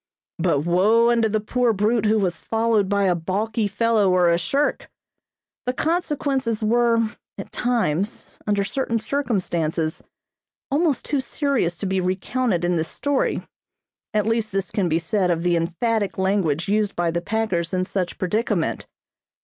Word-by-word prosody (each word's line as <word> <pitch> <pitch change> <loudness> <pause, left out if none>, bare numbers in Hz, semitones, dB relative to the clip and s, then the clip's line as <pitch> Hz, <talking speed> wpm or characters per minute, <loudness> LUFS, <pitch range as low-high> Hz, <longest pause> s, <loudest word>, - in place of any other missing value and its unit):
But 140 - +2
woe 210 +8 +4
unto 230 -2 +2
the 215 +1 +1
poor 235 +2 +1
brute 215 +2 +1
who 220 +1 +3
was 180 -5 -1
followed 225 -3 +1
by 200 -1 +2
a 185 -2 +3
balky 205 +6 -1
fellow 220 -1 +2
or 180 -2 +4
a 170 - +3
shirk! 275 +12 -1 0.8
The 250 - +1
consequences 275 -8 -1
were, 230 0 +2 0.3
at 195 - -8
times, 220 -6 -1
under 205 -1 +2
certain 230 +2 -1
circumstances, 180 - -1 0.7
almost 295 -2 +1
too 290 - 0
serious 265 - -1
to 200 - -4
be 190 0 0
recounted 185 +1 0
in 175 0 +1
this 160 0 -2
story, 285 -1 -1 0.6
at 210 -1 +1
least 225 -1 0
this 195 -2 -2
can 190 -4 0
be 160 - +2
said 180 +3 0
of 170 -1 0
the 175 -1 +2
emphatic 200 +6 -1
language 190 -5 +1
used 210 0 +1
by 170 -1 0
the 170 +1 -2
packers 185 -5 -1
in 185 0 0
such 185 -2 -3
predicament. 210 +5 -1
205 Hz, 155 wpm, -23 LUFS, 180-230 Hz, 0.8 s, woe